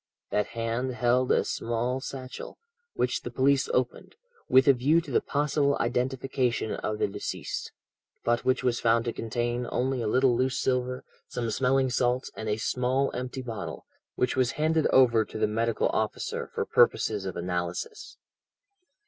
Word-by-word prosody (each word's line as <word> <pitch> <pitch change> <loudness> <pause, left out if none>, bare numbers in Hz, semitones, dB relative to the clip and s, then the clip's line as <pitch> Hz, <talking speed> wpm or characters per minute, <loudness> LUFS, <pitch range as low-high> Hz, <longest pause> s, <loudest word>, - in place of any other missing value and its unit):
That 105 - +1
hand 115 +3 -1
held 125 +1 +2
a - - +3
small 120 +3 -1
satchel, 130 -1 -7 0.4
which - - 0
the - - -5
police 135 0 +2
opened, 125 -1 -2 0.3
with 130 0 +6
a 140 - +8
view 140 +6 +3
to 160 -4 -7
the - - +3
possible 145 -1 +1
identification 125 -1 0
of 110 - -3
the - - +1
deceased, 100 - -5 0.5
but 120 0 +1
which 130 0 +1
was 125 -2 +1
found 115 0 +2
to 115 - -2
contain 120 +1 -2
only 130 0 0
a 115 - -1
little 130 +2 +3
loose 130 +1 0
silver, 125 0 -1 0.2
some 115 -2 -3
smelling 130 +2 +2
salts, 125 +2 0
and 110 - -4
a 105 - 0
small 130 +4 0
empty 125 +1 -4
bottle, 115 -5 -6 0.3
which 125 - 0
was 130 -3 +2
handed 155 +1 +2
over 120 -4 +5
to 110 - -8
the 110 - +2
medical 115 +2 0
officer 110 -1 -2
for - - -2
purposes 105 -3 +2
of 95 - -5
analysis. 90 0 -4
125 Hz, 160 wpm, -28 LUFS, 115-130 Hz, 0.5 s, a